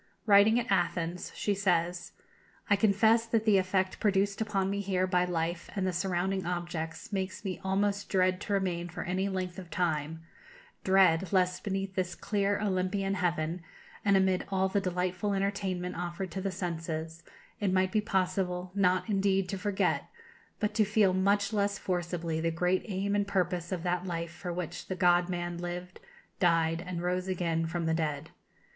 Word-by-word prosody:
Writing 210 +2 +6
at 240 - -2
Athens, 175 0 0
she 205 - 0
says: 175 -3 0 0.6
"I - - +8
confess 220 +3 +3
that 225 -1 +1
the 205 -3 +5
effect 185 0 0
produced 200 0 +1
upon 200 -3 0
me 200 - -1
here 190 -2 0
by 180 -1 +2
life 170 -1 -2
and 195 -2 0
the 185 - 0
surrounding 185 +2 -1
objects 175 +3 -4
makes 190 +1 -3
me 185 -2 -3
almost 200 +1 0
dread 185 -1 +2
to 205 - -3
remain 175 -3 -1
for 175 - -5
any 185 +3 -1
length 185 -1 -3
of 180 -3 -10
time; 160 -1 -1 0.6
dread, 190 -2 +4
lest 185 -2 +2
beneath 195 -1 -2
this 185 -1 -2
clear 205 -1 0
Olympian 195 0 0
heaven, 175 -2 -1 0.4
and 200 -1 +4
amid 190 -1 +2
all 190 -1 +2
the 200 +1 0
delightful 185 +2 -1
entertainment 195 -2 -2
offered 175 +1 -4
to 190 - -4
the 195 - -1
senses, 165 -3 -4 0.4
it 200 -3 +1
might 185 0 +2
be 215 - +2
possible, 185 -2 -1
not, 185 -2 +2
indeed, 195 -2 +2
to 195 - -2
forget, 200 0 0 0.5
but 210 -2 0
to 215 0 +4
feel 210 -2 +3
much 200 +2 +2
less 200 -1 +1
forcibly 175 -4 -2
the 165 - +1
great 180 +3 +1
aim 200 0 -1
and 205 -1 +1
purpose 180 -3 -1
of 180 -3 -2
that 180 0 -1
life 170 -1 -3
for 175 +1 -6
which 175 -1 -5
the 185 - -3
God 175 0 +3
Man 175 -1 -3
lived, 175 +1 -6 0.4
died, 165 -2 +2
and 175 -1 -4
rose 180 +1 -1
again 170 -3 0
from 170 0 -2
the 160 - +1
dead. 155 -2 -2
185 Hz, 175 wpm, -30 LUFS, 175-195 Hz, 0.6 s, I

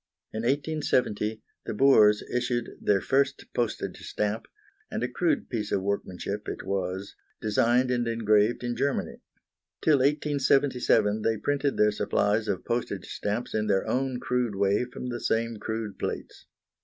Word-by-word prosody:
In 110 - -3
1870 125 -6 0 0.2
the - - -3
Boers 105 -5 +6
issued 125 -1 -2
their 100 -2 +2
first 135 +1 +1
postage 120 -3 -2
stamp, 105 +1 -2 0.4
and - - -3
a - - +1
crude 315 -4 0
piece 105 -4 -3
of 95 - +1
workmanship 100 +1 -3
it - - -6
was, 95 0 -3 0.2
designed 120 +4 +2
and 120 -1 0
engraved 110 0 +2
in 120 0 -2
Germany. 140 +3 -1 0.6
Till 155 -3 +4
1877 135 -6 +2
they 110 0 +1
printed 145 +3 0
their 105 0 +4
supplies 105 +1 +1
of 90 - -2
postage 120 +1 -3
stamps 105 +4 -3
in 110 0 0
their 95 -2 +1
own 130 -1 0
crude 125 -5 -1
way 100 +4 +2
from 125 0 -7
the 120 -1 -3
same 115 0 0
crude 110 -1 -4
plates. - - -5
115 Hz, 145 wpm, -27 LUFS, 105-125 Hz, 0.6 s, Boers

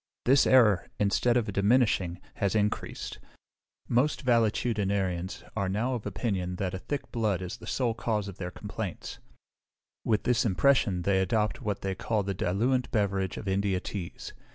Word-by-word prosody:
This 135 +2 +5
error, 110 -8 +5
instead 110 +4 +2
of 110 -4 -1
diminishing, 100 -4 +2 0.2
has 100 +1 0
increased: 105 -1 -2 0.7
most 130 +6 +1
valetudinarians 100 -6 0
are 100 -3 0
now 115 +7 0
of 120 -4 -4
opinion 90 -6 -2
that 90 0 -2
a 95 - -3
thick 145 +8 -5
blood 110 -6 0
is 90 -1 -5
the - - -12
sole 125 -3 0
cause 110 -3 -1
of 100 - -9
their 90 -2 -3
complaints; 105 0 -6 0.8
with 110 -2 +1
this 125 -1 +2
impression 105 -4 +2
they 95 0 +2
adopt 105 +3 0
what 105 -1 -2
they 95 0 -2
call 105 +2 -1
the 100 +1 -2
diluent 120 +8 0
beverage 100 -3 0
of - - -7
India 95 -1 +1
teas. 90 -2 -6
105 Hz, 155 wpm, -28 LUFS, 95-115 Hz, 0.8 s, This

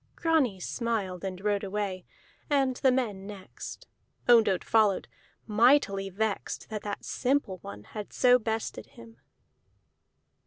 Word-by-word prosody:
Grani 305 - +2
smiled 200 -3 -2
and 185 -1 -4
rode 205 -1 +1
away, 195 -2 -3 0.4
and 270 -3 +2
the 260 - +4
men 210 -7 -1
next; 200 -3 -9 0.4
Ondott 225 -6 +5
followed, 215 -4 +2 0.4
mightily 215 -3 +3
vexed 210 +2 -3
that 215 -1 -3
that 205 -1 -5
simple 250 -8 0
one 105 -7 -9
had 210 - -8
so 250 0 +5
bested 220 -1 -3
him. 235 -2 -15
215 Hz, 120 wpm, -28 LUFS, 195-245 Hz, 0.4 s, Ondott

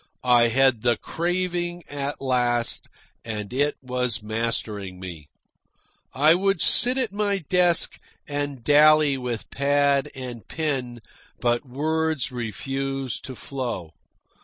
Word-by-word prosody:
I 120 -2 +5
had 130 -1 +3
the 120 -1 +2
craving 175 0 -2
at 145 0 -4
last, 120 -3 +1 0.3
and 105 -1 -5
it 145 +3 +1
was 125 -4 -1
mastering 105 -4 -2
me. 85 -5 -8 0.8
I 150 +4 +5
would 195 +1 +1
sit 250 +9 +4
at 250 -6 -1
my 205 -1 0
desk 175 0 +2 0.3
and 145 -3 -3
dally 150 +1 +5
with 125 -3 -5
pad 140 0 +2
and 125 -5 -7
pen, 130 -7 -3 0.4
but 120 +2 0
words 155 0 -1
refused 135 +3 -4
to 130 - -7
flow. 120 - -5
135 Hz, 115 wpm, -24 LUFS, 120-155 Hz, 0.8 s, I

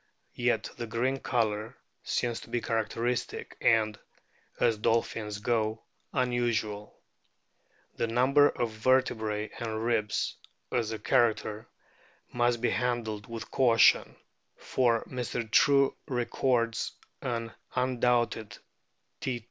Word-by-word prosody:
Yet - - +1
the 120 -1 -4
green 125 +5 0
colour 110 -4 -1 0.3
seems 120 -1 -1
to - - -13
be 120 - 0
characteristic 115 +2 -2
and, 110 -2 +3 0.6
as 115 -3 +2
dolphins 110 -1 0
go, 110 0 -1 0.3
unusual. 115 -4 -1 1.0
The - - 0
number 130 +5 +4
of 120 -2 -2
vertebrae 110 -2 +1
and 110 -1 -3
ribs, 110 -3 0 0.3
as 115 -3 0
a 110 - -3
character, 110 -1 +1 0.7
must 120 -1 +1
be 120 - +2
handled 115 -4 -2
with 115 -1 -7
caution, 120 -4 +4 0.4
for 120 -3 +1
Mr. 125 -2 -3
True 140 +2 +5
records 120 -2 0 0.3
an 115 -2 -3 0.2
un 125 -1 0
doubted 120 -3 +1 0.6
T. 125 -2 -2
115 Hz, 110 wpm, -29 LUFS, 110-125 Hz, 1.0 s, True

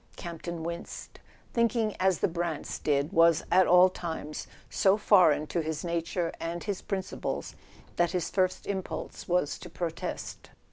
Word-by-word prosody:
Campton 170 0 -6
winced. 170 +1 -6 0.3
Thinking 230 -2 +1
as 190 -2 +3
the - - +4
Brants 170 -3 -3
did 145 +4 +1
was, 165 -2 +5
at 185 0 +6
all 180 +1 +8
times, 160 -4 -5 0.2
so 195 +1 +3
foreign 180 -8 +5
to 170 +2 -1
his 160 +1 -3
nature 170 0 -1
and 170 +1 -4
his 200 -3 -3
principles 195 -2 -3 0.4
that 175 0 +3
his 180 -1 -2
first 185 -1 +1
impulse 190 -2 -5
was 175 -4 +1
to - - -9
protest. 165 -2 -5
175 Hz, 145 wpm, -29 LUFS, 165-185 Hz, 0.4 s, all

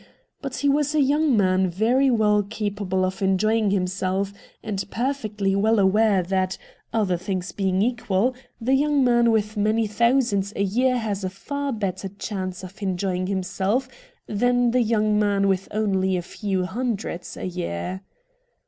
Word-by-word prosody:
But 275 -2 -5
he 285 - 0
was 290 +1 +2
a - - +3
young 285 -1 +3
man 185 -1 +3
very 235 +9 +2
well 210 -3 +3
capable 200 -3 -2
of 185 +1 -4
enjoying 210 +3 +2
himself, 190 +1 -1 0.3
and 205 -3 -2
perfectly 215 -6 -1
well 220 +3 +3
aware 200 0 +3
that, 185 +1 -1 0.3
other 205 -6 +1
things 185 0 -3
being 190 -1 0
equal, 240 -1 +1 0.3
the 250 +3 +1
young 290 0 +3
man 240 -1 +4
with 215 -1 +1
many 215 +2 +1
thousands 215 -2 +1
a 200 - 0
year 250 +6 +2
has 210 -4 -3
a 185 - -1
far 280 +9 -4
better 195 -4 -3
chance 190 -2 -5
of 185 +3 -11
enjoying 185 -1 -1
himself 195 +6 -1 0.4
than 245 +3 +2
the 250 +1 +3
young 215 -2 +2
man 200 -1 +2
with 195 -1 0
only 190 -3 0
a 175 - -3
few 190 0 -2
hundreds 210 -3 -4
a - - -5
year. 180 - -4
205 Hz, 155 wpm, -24 LUFS, 190-235 Hz, 0.4 s, man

